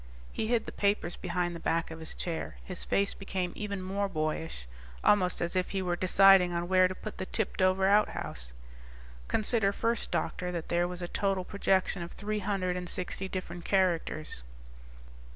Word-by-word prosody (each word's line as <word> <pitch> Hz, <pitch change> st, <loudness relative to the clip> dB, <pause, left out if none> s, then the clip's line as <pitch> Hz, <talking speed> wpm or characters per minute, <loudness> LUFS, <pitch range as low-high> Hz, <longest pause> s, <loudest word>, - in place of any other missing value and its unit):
He 220 Hz, -, -1 dB
hid 235 Hz, -1 st, +1 dB
the -, -, -6 dB
papers 200 Hz, -3 st, 0 dB
behind 175 Hz, -1 st, -2 dB
the -, -, -6 dB
back 165 Hz, 0 st, 0 dB
of 160 Hz, -, -7 dB
his 160 Hz, -, -7 dB
chair; 165 Hz, -2 st, -4 dB
his 185 Hz, -1 st, -4 dB
face 200 Hz, 0 st, +1 dB
became 190 Hz, -2 st, -3 dB
even 200 Hz, -3 st, -4 dB
more 200 Hz, +2 st, -1 dB
boyish, 155 Hz, -, -3 dB, 0.4 s
almost 185 Hz, -3 st, +3 dB
as 170 Hz, +1 st, -1 dB
if 185 Hz, 0 st, +1 dB
he 195 Hz, -, -1 dB
were 175 Hz, -1 st, 0 dB
deciding 185 Hz, 0 st, +6 dB
on 170 Hz, 0 st, -2 dB
where 185 Hz, 0 st, +5 dB
to 185 Hz, -, -6 dB
put 215 Hz, -, -8 dB
the 185 Hz, -, -3 dB
tipped 220 Hz, -3 st, -2 dB
over 185 Hz, +1 st, +3 dB
outhouse. 195 Hz, -, +1 dB, 0.8 s
"Consider 215 Hz, -2 st, +2 dB
first, 230 Hz, +3 st, 0 dB
doctor, 180 Hz, 0 st, -2 dB
that 170 Hz, -2 st, -5 dB
there 175 Hz, 0 st, +2 dB
was 180 Hz, 0 st, -5 dB
a -, -, -2 dB
total 195 Hz, 0 st, 0 dB
projection 190 Hz, -1 st, +1 dB
of 170 Hz, -, -6 dB
three 210 Hz, +1 st, -3 dB
hundred 190 Hz, -3 st, -1 dB
and 180 Hz, -1 st, -5 dB
sixty 185 Hz, +1 st, -2 dB
different 175 Hz, -2 st, -5 dB
characters. 170 Hz, -, 0 dB
185 Hz, 180 wpm, -30 LUFS, 175-195 Hz, 0.8 s, deciding